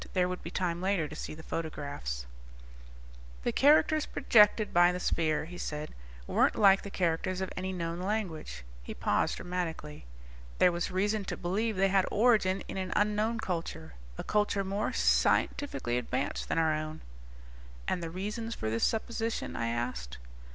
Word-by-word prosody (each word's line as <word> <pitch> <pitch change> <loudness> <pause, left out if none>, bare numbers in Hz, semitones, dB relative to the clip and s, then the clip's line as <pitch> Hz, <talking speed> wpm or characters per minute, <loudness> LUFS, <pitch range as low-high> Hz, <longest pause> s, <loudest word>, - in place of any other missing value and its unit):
There 180 -1 +2
would 180 0 -4
be 170 - -6
time 175 -1 -2
later 190 -4 +1
to 150 - -9
see 155 - -6
the 160 - -11
photographs. 140 - -4 1.2
"The - - +1
characters 305 +2 +4
projected 210 -1 +4
by 175 +1 +6
the 180 - -3
sphere," 160 -3 0
he 175 +2 -9
said, 150 0 -4 0.3
"weren't - - +2
like 195 -2 +6
the 200 - -7
characters 180 0 -1
of 190 - -3
any 185 +1 -3
known 170 -2 -3
language." 185 - -3 0.2
He - - -8
paused - - +1
dramatically. 165 - -5 0.5
"There 180 - +5
was 175 0 -2
reason 205 +3 0
to - - -4
believe 210 +5 -1
they 195 +1 +3
had 190 -1 +3
origin 205 -4 +3
in - - -5
an 185 -1 -2
unknown 210 +2 +1
culture. 165 - -4 0.2
A - - -4
culture 210 -1 +1
more 200 +2 -1
scientifically 130 - +1
advanced 130 +3 -3
than - - 0
our 160 -1 +3
own." 155 0 -4 0.9
"And 180 - 0
the 165 - -4
reasons 210 +6 -4
for 110 0 -3
this 115 +1 -1
supposition?" 225 0 -1
I 115 - -1
asked. 115 - -3
180 Hz, 165 wpm, -30 LUFS, 155-205 Hz, 1.2 s, by